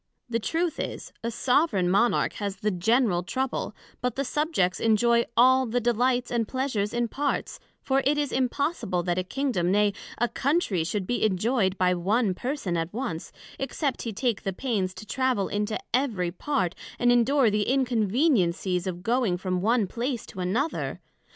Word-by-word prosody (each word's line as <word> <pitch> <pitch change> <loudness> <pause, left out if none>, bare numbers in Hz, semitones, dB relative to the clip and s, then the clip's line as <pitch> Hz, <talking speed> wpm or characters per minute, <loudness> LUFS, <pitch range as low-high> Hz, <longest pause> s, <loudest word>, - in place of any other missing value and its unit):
The 230 -1 -1
truth 330 +8 -1
is, - - -5
a 230 - -1
soveraign 245 - +2
Monarch 205 +6 +2
has 200 -1 -2
the 210 +2 -1
general 200 0 +2
trouble; 260 +8 -3 0.3
but 250 -2 -1
the 275 - -1
Subjects 295 - 0
enjoy 235 +1 +3
all 260 +2 +5
the 240 +2 0
delights 245 +1 +1
and 235 -3 0
pleasures 255 -6 -1
in 240 0 0
parts, 285 +5 -2 0.2
for 270 0 +2
it 290 +2 +2
is 290 -2 0
impossible, 255 - 0
that 175 +1 0
a - - -1
Kingdom, 190 -5 -1
nay, 205 0 +3 0.2
a 240 - +2
Country, 265 - 0
should 190 +3 -2
be 245 - -1
injoyed 200 -1 +1
by 180 -1 +3
one 195 +4 +1
person 245 -4 -3
at 165 +1 -2
once, 215 -9 -4 0.3
except 270 +1 -2
he 230 - -3
take 225 +1 -1
the 195 - -3
pains 195 -5 -2
to 185 - -9
travel 255 -3 0
into 210 +1 -1 0.2
every 225 -10 +1
part, 185 - -1 0.2
and 245 0 +3
endure 245 0 +4
the 210 0 0
inconveniencies 220 - +1
of 180 -1 -4
going 230 -5 +1
from 185 -1 -2
one 225 +2 +2
place 235 +4 -3
to 185 - -10
another? 220 - -1
230 Hz, 170 wpm, -26 LUFS, 190-260 Hz, 0.3 s, all